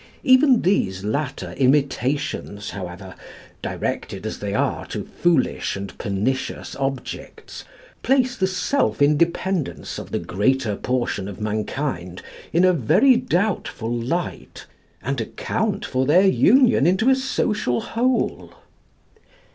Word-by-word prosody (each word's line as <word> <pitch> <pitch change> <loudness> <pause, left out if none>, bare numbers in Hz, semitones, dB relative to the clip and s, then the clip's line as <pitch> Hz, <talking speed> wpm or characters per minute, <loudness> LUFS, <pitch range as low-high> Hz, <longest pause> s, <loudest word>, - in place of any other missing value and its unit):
Even 255 -1 +5
these 95 - +1
latter 130 +6 -3
imitations, 135 -5 0
however, 95 0 -7 0.5
directed - - -4
as - - -4
they - - -3
are - - 0
to - - -4
foolish 170 -6 0
and 100 0 -7
pernicious 105 +7 -2
objects, 135 -2 -5 0.4
place 255 -1 +2
the 190 -5 +1
self 230 +9 0
independence 165 +3 0
of - - -8
the - - -1
greater 110 +3 0
portion 120 -5 -2
of 100 - -8
mankind 105 - -3 0.3
in 175 +3 +4
a 185 - +5
very 190 - +4
doubtful 200 - -1
light, 130 +9 -4 0.4
and 135 -2 -2
account 110 - -2
for 130 0 -1
their 180 +6 +5
union 225 - +5
into 190 +7 +2
a - - +5
social 210 - 0
whole. 250 +2 -1
140 Hz, 115 wpm, -22 LUFS, -, 0.5 s, Even